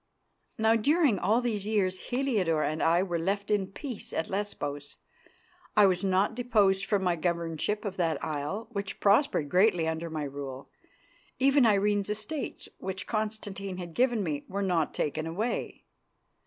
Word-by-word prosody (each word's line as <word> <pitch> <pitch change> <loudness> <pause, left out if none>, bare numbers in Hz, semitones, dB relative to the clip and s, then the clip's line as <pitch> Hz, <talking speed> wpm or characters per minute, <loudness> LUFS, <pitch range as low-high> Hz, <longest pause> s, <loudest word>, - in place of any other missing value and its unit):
Now 220 +1 +4
during 280 - +3
all 220 +6 +2
these 215 -4 -2
years 190 -4 +1
Heliodore 215 - +1
and 155 +1 -1
I 170 +3 +4
were 175 -3 -2
left 200 +4 -1
in 200 -2 +2
peace 235 +4 -7
at 160 - -2
Lesbos. 145 -8 -4 0.8
I 210 - +8
was 185 -1 +2
not 195 +3 +2
deposed 210 -5 +2
from 200 -3 +1
my 180 -2 +2
governorship 170 +4 -1
of 195 -2 -4
that 165 -4 0
isle, 155 +8 -3
which 200 -3 -4
prospered 200 - +3
greatly 180 0 +3
under 160 +1 -2
my 155 -1 -3
rule. 140 -1 -7 0.7
Even 270 -1 +5
Irene's 205 -1 +2
estates, 215 +8 -4
which 190 0 -4
Constantine 205 -3 -3
had 175 -2 -7
given 240 -2 +2
me, 150 -4 -2
were 200 +1 -2
not 175 -5 0
taken 155 +2 -1
away. 215 +9 -3
195 Hz, 155 wpm, -29 LUFS, 165-215 Hz, 0.8 s, I